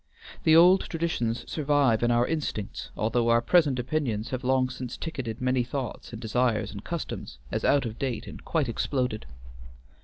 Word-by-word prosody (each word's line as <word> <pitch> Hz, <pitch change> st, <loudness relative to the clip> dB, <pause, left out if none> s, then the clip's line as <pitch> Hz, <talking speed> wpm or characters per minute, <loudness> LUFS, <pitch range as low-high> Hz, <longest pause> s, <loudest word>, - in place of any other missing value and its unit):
The 160 Hz, -, +6 dB
old 180 Hz, +3 st, +7 dB
traditions 155 Hz, -9 st, -2 dB
survive 145 Hz, -6 st, +2 dB
in 120 Hz, -, +2 dB
our 120 Hz, 0 st, +3 dB
instincts, 140 Hz, -10 st, -3 dB
although 115 Hz, +2 st, +1 dB
our 115 Hz, 0 st, +5 dB
present 145 Hz, 0 st, +3 dB
opinions 125 Hz, -4 st, -2 dB
have 130 Hz, 0 st, -3 dB
long 130 Hz, 0 st, +2 dB
since 125 Hz, -2 st, -6 dB
ticketed 125 Hz, -9 st, -5 dB
many 130 Hz, 0 st, +1 dB
thoughts 125 Hz, 0 st, -5 dB
and 115 Hz, -, -7 dB
desires 120 Hz, 0 st, 0 dB
and 100 Hz, -1 st, -8 dB
customs 165 Hz, -, -5 dB
as -, -, -2 dB
out 140 Hz, -2 st, +3 dB
of 115 Hz, -1 st, -5 dB
date 130 Hz, -5 st, -2 dB
and -, -, -10 dB
quite -, -, 0 dB
exploded. 125 Hz, -, -2 dB
125 Hz, 165 wpm, -27 LUFS, 115-145 Hz, -, old